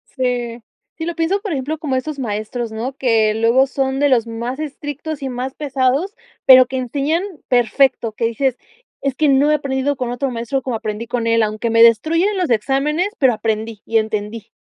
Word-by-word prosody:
Sí. 245 -2 -2 0.4
Sí, 325 - -4
lo 340 - -2
pienso, 335 +4 0
por 405 -3 -4
ejemplo, 290 +3 -3
como 290 -4 -2
estos 290 +3 -3
maestros, 225 -1 -4
¿no?, 235 +5 -4
que 220 -4 +2
luego 235 +4 +3
son 270 0 -1
de 290 0 +3
los 235 -3 +3
más 235 +3 -5
estrictos 300 0 -6
y 270 - -3
más 255 +1 -4
pesados, 280 - 0 0.3
pero 255 -1 +9
que 260 +2 -5
enseñan 280 +6 -1 0.3
perfecto. 245 -1 +2
Que 230 - -2
dices: 245 +2 0 0.4
"Es 275 -1 -1
que 310 - +2
no 280 +2 +4
he 300 - +4
aprendido 275 0 -1
con 250 -1 -3
otro 255 +2 -2
maestro 235 +3 -2
como 255 -3 -2
aprendí 215 +1 -4
con 235 -1 -2
él", 230 -1 +3
aunque 215 +2 -2
me 230 0 +5
destruyen 330 - +3
los 360 -6 0
exámenes, 275 - +1
pero 260 -4 +4
aprendí 220 0 -3
y 225 - +1
entendí. 215 0 -4
255 Hz, 195 wpm, -19 LUFS, 230-285 Hz, 0.4 s, pero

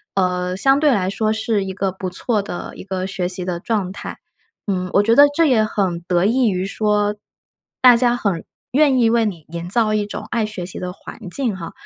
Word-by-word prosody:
呃， 180 -1 0
相 270 +7 +3
对 300 -2 +4
来 190 -3 0
说 215 +2 0
是 220 -2 -1
一 190 - -5
个 195 -1 -1
不 190 0 -5
错 215 +2 0
的 185 -3 -7
一 - - -9
个 190 -1 -3
学 185 -2 -2
习 180 0 -1
的 175 -2 -3
状 200 -3 -2
态。 - - -8 0.5
嗯， 185 -2 -1
我 200 - +5
觉 225 +2 +3
得 285 - +9
这 330 - +4
也 240 -6 +3
很 190 -5 -1
得 175 +1 +1
益 235 +2 +3
于 185 0 -1
说， 210 0 0 0.7
大 250 -2 +8
家 240 0 +2
很 195 -8 -2 0.3
愿 280 -3 +4
意 230 -1 +4
为 230 -1 +2
你 175 -7 -5
营 170 +1 -6
造 215 0 +2
一 210 -1 0
种 205 - -7
爱 230 -2 0
学 195 -5 -5
习 180 - -4
的 180 -1 -4
环 - - -11
境 235 -1 -1
哈。 165 - -7
200 Hz, 240 characters per minute, -20 LUFS, 185-230 Hz, 0.7 s, 得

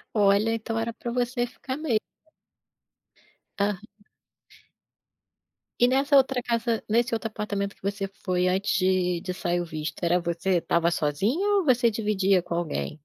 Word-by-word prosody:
Olha, 205 +2 +4
então 225 0 -3
era 230 +1 -2
pra 235 +1 -6
você 245 0 0
ficar 260 +2 -6
me 305 -6 -2 1.7
Aham. 200 -1 0 2.0
E 245 - +6
nessa 275 +2 +3
outra 265 -2 +3
casa, 230 -1 -1
nesse 235 +2 +2
outro 225 0 -2
apartamento 205 -2 -3
que - - -33
você 200 0 -2 0.2
foi 180 -1 +1
antes 190 +2 0
de 185 -2 +1
de 185 0 -4
sair 175 -1 -1
o - - -2
visto, 155 0 -6
era 175 +1 +3
você 170 +2 0
estava 170 0 +1
sozinho 225 - +1
ou - - -3
você 245 -3 +4
dividia 200 -4 +1
com 170 - -5
alguém? 155 - -3
205 Hz, 150 wpm, -26 LUFS, 180-235 Hz, 2.0 s, E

